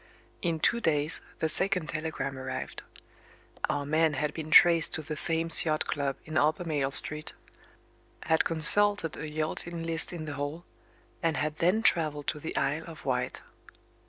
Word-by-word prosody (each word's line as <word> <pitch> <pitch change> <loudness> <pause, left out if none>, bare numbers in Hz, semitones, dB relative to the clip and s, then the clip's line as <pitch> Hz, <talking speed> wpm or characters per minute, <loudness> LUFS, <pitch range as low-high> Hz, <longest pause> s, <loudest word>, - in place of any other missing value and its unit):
In 165 -3 -2
two 235 +8 0
days, 150 -4 +1 0.2
the 160 - -1
second 180 +1 +2
telegram 155 -3 -5
arrived. 130 0 -7 0.9
Our 145 0 -2
man 155 +1 0
had 150 +2 -3
been 155 -1 -7
traced 170 0 +5
to 155 - 0
the 155 +1 -6
Thames 165 +1 +1
Yacht 155 -2 -1
Club 140 -2 -3
in 155 0 -2
Albemarle 155 -2 -1
Street 150 +2 +1 0.9
had 160 0 +1
consulted 165 +1 +7
a 150 - -7
yachting 155 +2 -5
list 165 0 0
in 165 -3 -7
the 155 - -6
hall 145 +5 -6 0.6
and 165 -2 -1
had 150 0 -3
then 185 +7 +1
travelled 155 -7 0
to 150 - -4
the 160 - -7
Isle 145 +4 -2
of 160 -4 -12
Wight. 125 -2 -3
155 Hz, 160 wpm, -27 LUFS, 150-165 Hz, 0.9 s, consulted